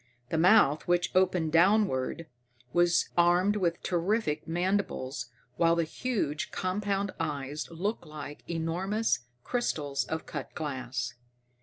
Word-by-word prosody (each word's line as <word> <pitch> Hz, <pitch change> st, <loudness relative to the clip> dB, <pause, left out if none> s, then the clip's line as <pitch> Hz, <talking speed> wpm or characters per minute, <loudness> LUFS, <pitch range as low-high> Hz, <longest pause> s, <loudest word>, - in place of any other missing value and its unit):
The 160 Hz, -, +1 dB
mouth, 180 Hz, -5 st, +5 dB
which 175 Hz, 0 st, +2 dB
opened 185 Hz, -4 st, +2 dB
downward, 170 Hz, -4 st, +3 dB, 0.5 s
was 175 Hz, 0 st, +3 dB
armed 175 Hz, +4 st, +4 dB
with 175 Hz, -4 st, 0 dB
terrific 175 Hz, -2 st, 0 dB
mandibles, 165 Hz, -8 st, -1 dB, 0.3 s
while 165 Hz, 0 st, +4 dB
the 170 Hz, -, +2 dB
huge, 160 Hz, -, -2 dB
compound 200 Hz, +1 st, -1 dB
eyes 150 Hz, -2 st, -3 dB
looked 175 Hz, +2 st, -3 dB
like 150 Hz, -1 st, -8 dB
enormous 175 Hz, -, 0 dB, 0.2 s
crystals 150 Hz, -, -1 dB
of 160 Hz, 0 st, -4 dB
cut -, -, -6 dB
glass. 130 Hz, -5 st, -3 dB
170 Hz, 115 wpm, -29 LUFS, 150-190 Hz, 0.5 s, mouth